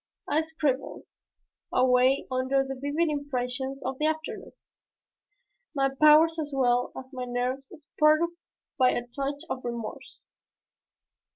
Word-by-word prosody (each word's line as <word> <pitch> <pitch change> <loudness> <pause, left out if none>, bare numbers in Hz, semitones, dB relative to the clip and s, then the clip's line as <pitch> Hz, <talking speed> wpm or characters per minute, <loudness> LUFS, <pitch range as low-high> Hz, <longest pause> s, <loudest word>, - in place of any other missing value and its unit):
I 310 - +2
scribbled 305 -4 -2 0.7
away 255 +1 +3
under 260 +1 +1
the 270 0 -5
vivid 285 +5 -1
impressions 270 -2 -3
of 265 0 -4
the 305 - +2
afternoon, 315 0 -4 1.2
my 270 -1 +2
powers 305 +3 +6
as 295 -2 -3
well 245 -2 +1
as 260 +1 -9
my 255 -1 -4
nerves 250 +2 -3
spurred 305 0 +2 0.6
by 255 -1 +6
a 240 - -2
touch 280 +4 -4
of 260 -5 -4
remorse. 235 -2 -7
270 Hz, 120 wpm, -27 LUFS, 255-300 Hz, 1.2 s, powers